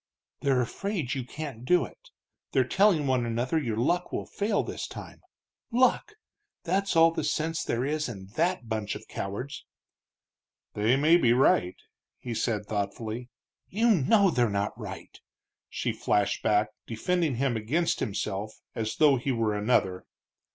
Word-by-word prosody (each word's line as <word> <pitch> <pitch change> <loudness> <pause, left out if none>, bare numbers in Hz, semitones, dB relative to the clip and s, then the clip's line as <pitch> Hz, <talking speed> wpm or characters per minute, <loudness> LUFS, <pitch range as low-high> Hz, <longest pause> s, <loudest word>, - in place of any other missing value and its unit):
"They're 135 -3 +2
afraid 165 - -3
you 135 -2 -3
can't 135 -2 -7
do 175 +7 +3
it, - - -16 0.4
they're 130 - +4
telling 190 -3 +3
one 130 -2 +2
another 120 +6 0
your 115 -6 -2
luck 175 +9 0
will - - -3
fail 205 +1 -1
this - - -5
time. - - -10 0.5
Luck! 255 - +2 0.5
that's 195 +2 0
all 165 0 +6
the - - -3
sense 160 +2 -1
there 120 +2 -1
is 150 -1 -1
in 95 -5 -8
that 170 -5 0
bunch 110 -2 -2
of - - -10
cowards." 115 +9 -5 1.1
"They 110 +4 +2
may 155 +5 +5
be 120 -8 +4
right," 105 -7 +3 0.4
he 120 - -5
said, 110 -2 -1
thoughtfully. 110 +4 -4 0.4
"You 230 +4 +3
know 195 - +4
they're 120 -6 +2
not 100 0 -1
right!" - - -9 0.5
she - - -2
flashed 100 -1 0
back, 105 0 +2 0.2
defending 160 +5 0
him 130 0 0
against 145 +11 0
himself 105 -1 -3 0.2
as 110 -1 -3
though 145 -3 +5
he 130 +3 -1
were 115 -3 0
another. 105 -4 +1
125 Hz, 150 wpm, -28 LUFS, 110-165 Hz, 1.1 s, all